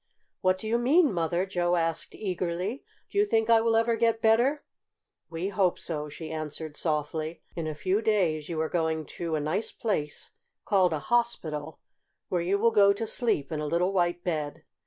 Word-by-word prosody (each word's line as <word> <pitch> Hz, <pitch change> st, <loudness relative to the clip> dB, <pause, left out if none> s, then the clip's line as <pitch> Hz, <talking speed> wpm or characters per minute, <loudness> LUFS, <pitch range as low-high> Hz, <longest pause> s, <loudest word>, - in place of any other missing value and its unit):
"What 185 Hz, -1 st, +2 dB
do 215 Hz, -, -6 dB
you 235 Hz, +2 st, +1 dB
mean, 285 Hz, -, +4 dB
Mother?" 170 Hz, +1 st, 0 dB
Joe 175 Hz, -2 st, 0 dB
asked 165 Hz, -1 st, -1 dB
eagerly. 185 Hz, +4 st, -3 dB, 0.3 s
"Do 405 Hz, -, 0 dB
you 410 Hz, -, +5 dB
think 225 Hz, -, +2 dB
I 225 Hz, -1 st, +6 dB
will 225 Hz, 0 st, +2 dB
ever 230 Hz, +1 st, +3 dB
get 230 Hz, 0 st, +2 dB
better?" 240 Hz, +7 st, +3 dB, 0.7 s
"We 170 Hz, +3 st, -3 dB
hope 185 Hz, -2 st, +1 dB
so," 150 Hz, -3 st, -4 dB
she 160 Hz, +2 st, -7 dB
answered 155 Hz, -1 st, -4 dB
softly. 155 Hz, +1 st, -2 dB
"In 165 Hz, -2 st, -3 dB
a 155 Hz, -, -3 dB
few 190 Hz, +7 st, 0 dB
days 175 Hz, -9 st, +1 dB
you 165 Hz, -2 st, -3 dB
are 160 Hz, -, 0 dB
going 160 Hz, -2 st, -1 dB, 0.2 s
to 165 Hz, -2 st, -1 dB
a -, -, 0 dB
nice 155 Hz, +9 st, -1 dB
place, 150 Hz, -10 st, -3 dB, 0.3 s
called 190 Hz, -4 st, +3 dB
a 155 Hz, -, 0 dB
hospital, 160 Hz, -7 st, -1 dB, 0.5 s
where 180 Hz, -2 st, 0 dB
you 185 Hz, +4 st, +1 dB
will 230 Hz, +3 st, +3 dB
go 200 Hz, -2 st, +6 dB
to 225 Hz, +3 st, -3 dB
sleep 220 Hz, -, -1 dB
in 155 Hz, -, -2 dB
a 150 Hz, -, -2 dB
little 180 Hz, +5 st, +1 dB
white 175 Hz, -1 st, +1 dB
bed. 155 Hz, -4 st, -3 dB
175 Hz, 190 wpm, -28 LUFS, 160-220 Hz, 0.7 s, I